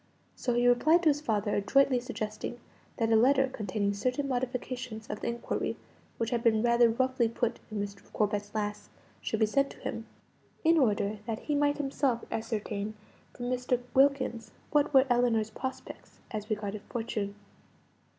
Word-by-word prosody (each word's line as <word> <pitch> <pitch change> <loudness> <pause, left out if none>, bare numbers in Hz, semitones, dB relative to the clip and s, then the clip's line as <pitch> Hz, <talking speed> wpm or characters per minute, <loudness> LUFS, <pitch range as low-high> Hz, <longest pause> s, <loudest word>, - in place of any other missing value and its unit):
So 245 -2 -1
he 240 0 +3
replied 310 +8 +5
to 320 - +6
his 295 0 +1
father, 210 -6 0
adroitly 260 +5 +3
suggesting 235 -1 -5 0.4
that 225 -1 +1
a - - +6
letter 265 +4 +5
containing 205 -1 -1
certain 250 +7 -1
modifications 250 -3 -3
of - - -4
the - - -4
inquiry 235 0 -2 0.4
which 230 -1 -1
had 240 -2 +1
been 220 -1 +3
rather 235 0 +5
roughly 255 0 +1
put 230 0 -1
in 215 -1 -4
Mr. 200 0 -6
Corbet's 205 0 -1
last, 210 -1 -3 0.3
should 220 - -2
be 220 - +5
sent 275 +6 +2
to - - -12
him, - - -5 0.6
in 330 0 +5
order 210 -4 +1
that 225 -1 -3
he 300 - -2
might 290 0 +2
himself 275 -4 0
ascertain 215 -2 -3 0.4
from 245 - -5
Mr. 250 0 0
Wilkins 265 -5 +2 0.2
what 295 0 +3
were 265 -2 +6
Ellinor's 240 -3 +2
prospects 260 +4 -7
as 215 -1 -5
regarded 210 -1 -3
fortune. 215 -4 -3
235 Hz, 160 wpm, -30 LUFS, 215-260 Hz, 0.6 s, to